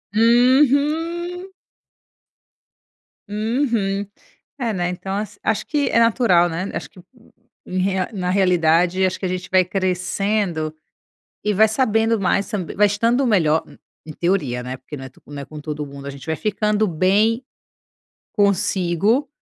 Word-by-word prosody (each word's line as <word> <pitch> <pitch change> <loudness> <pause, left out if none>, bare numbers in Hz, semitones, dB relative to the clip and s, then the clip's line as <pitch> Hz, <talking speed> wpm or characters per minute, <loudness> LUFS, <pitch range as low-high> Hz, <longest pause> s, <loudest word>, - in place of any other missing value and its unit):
Uhum. 295 - +2 1.8
Uhum. 215 -2 -1 0.5
É, 230 -4 -1
né. 180 -1 -1
Então 190 +2 -4
as 205 0 -5
acho 215 0 0
que 295 -2 0
é 230 - +3
natural, 220 -7 +4
né, 180 +4 -3
acho - - -5
que 185 - -17 0.7
em 185 - -5
rea 190 0 0
na 180 -3 -2
realidade, 180 -1 +3
acho 185 - -2
que - - -4
a 180 - -1
gente 185 0 -4
vai 185 0 +5
crescendo 185 -2 -1 0.7
e 210 - +1
vai 220 +3 +5
sabendo 225 -1 +1
mais 195 +1 0
tamb 195 -7 -4
vai 210 +1 +5
estando 230 +6 +1
melhor 160 -8 +2
e - - -19
em - - -10
teoria, 150 -9 -1
né, 130 +1 -5
porque 145 +3 -9
não 130 - -8
é - - -9
to 130 - -24
não 145 -1 -7
é - - -8
com 155 +2 -10
todo 150 -1 -4
mundo. 140 0 -10
A - - -3
gente 135 -2 -11
vai 160 - 0
ficando 210 +2 0
bem, 205 +8 +2 0.9
consigo, 200 - +1
195 Hz, 155 wpm, -21 LUFS, 175-225 Hz, 1.8 s, vai